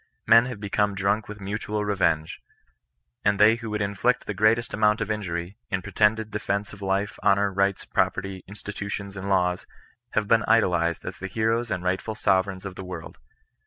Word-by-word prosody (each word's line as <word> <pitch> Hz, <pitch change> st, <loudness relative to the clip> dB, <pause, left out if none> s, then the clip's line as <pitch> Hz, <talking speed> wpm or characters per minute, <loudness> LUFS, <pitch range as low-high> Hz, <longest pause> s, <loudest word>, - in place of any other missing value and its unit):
Men 115 Hz, +1 st, +7 dB
have 125 Hz, -5 st, -6 dB
become 100 Hz, 0 st, 0 dB
drunk 100 Hz, +3 st, 0 dB
with 105 Hz, 0 st, -8 dB
mutual 105 Hz, +1 st, -3 dB
revenge; 90 Hz, -6 st, 0 dB, 0.8 s
and 100 Hz, -1 st, +2 dB
they 110 Hz, +2 st, +6 dB
who 115 Hz, -1 st, -6 dB
could 105 Hz, -1 st, -1 dB
inflict 100 Hz, +5 st, 0 dB
the 105 Hz, -, -3 dB
greatest 110 Hz, +3 st, +2 dB
amount 105 Hz, 0 st, +3 dB
of 105 Hz, 0 st, -2 dB
injury, 90 Hz, -2 st, -4 dB
in 95 Hz, -1 st, -2 dB
pretended 110 Hz, +2 st, +1 dB
defence 105 Hz, -1 st, -2 dB
of 100 Hz, -, -12 dB
life, 100 Hz, +1 st, -1 dB
honour, 100 Hz, 0 st, +3 dB
rights, 100 Hz, 0 st, +1 dB
property, 95 Hz, 0 st, -1 dB
institutions, 100 Hz, 0 st, -6 dB
and 95 Hz, 0 st, -5 dB
laws, 90 Hz, -2 st, +1 dB, 0.5 s
have 110 Hz, -1 st, +1 dB
been 115 Hz, +1 st, +4 dB
idolized 85 Hz, -7 st, +2 dB
as -, -, -6 dB
the 95 Hz, -, -4 dB
heroes 115 Hz, +3 st, 0 dB
and 90 Hz, -4 st, -2 dB
rightful 95 Hz, +4 st, -1 dB
sove 95 Hz, -2 st, +2 dB
reigns 95 Hz, 0 st, -7 dB
of 100 Hz, -, -5 dB
the 95 Hz, -, -8 dB
world. 90 Hz, -3 st, -8 dB
100 Hz, 180 wpm, -25 LUFS, 95-105 Hz, 0.8 s, Men